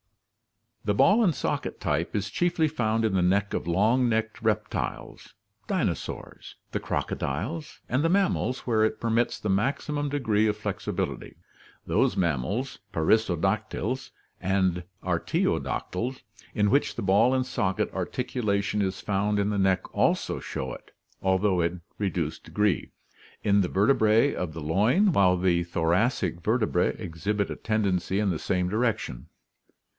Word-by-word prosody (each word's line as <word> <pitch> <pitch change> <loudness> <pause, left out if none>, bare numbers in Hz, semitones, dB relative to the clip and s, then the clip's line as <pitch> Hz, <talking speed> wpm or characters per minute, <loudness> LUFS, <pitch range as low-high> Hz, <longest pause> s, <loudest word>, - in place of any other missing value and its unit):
The 105 -1 0
ball 210 - +5
and 175 -8 +2
socket - - -2
type 80 +6 -1
is 105 0 -2
chiefly 175 +1 +1
found 115 -6 0
in 110 - +1
the 95 - +2
neck 100 +3 +2
of - - -2
long 110 +8 +3
necked 110 0 -1
reptiles 110 -1 -3 0.3
(dinosaurs), - - -3 0.2
the - - -1
crocodiles 130 - -3
and 130 +4 +1
the 165 - +3
mammals, 185 -8 +1
where 110 -3 +1
it 110 - 0
permits 115 +1 0
the - - -4
maximum 140 +7 0
degree 110 -7 +1
of 105 0 0
flexibility. 105 -2 -4 0.5
Those - - +1
mam 80 -8 +1
mals 115 - -3
(perissodactyls 95 +3 0 0.3
and 95 -2 +1 0.2
artiodactyls) 125 +8 -1 0.3
in 105 -1 +2
which 140 - +2
the - - -4
ball 100 +7 +4
and 130 -1 +1
socket 95 -6 -1
articulation 105 -3 -1
is 95 -1 -2
found 105 +1 0
in 100 +1 +1
the 100 - 0
neck 95 -1 +2
also - - +1
show 65 -2 -5
it, - - -12 0.3
although 95 -1 +2
in 85 +1 -1 0.2
reduced 90 -6 -2
degree, 105 -3 0 0.5
in 100 0 +4
the 90 - +1
vertebrae 110 +4 +3
of 90 -4 -3
the 80 - -6
loin, 120 - +3
while 95 - +4
the 90 -1 +2
thoracic 85 +2 0
vertebrae 110 -3 +1
exhibit 100 +2 -2
a - - -3
tendency 100 -4 0
in 105 -2 +1
the 80 - -2
same 90 -2 0
direction. 110 - -1
105 Hz, 140 wpm, -27 LUFS, 95-115 Hz, 0.5 s, ball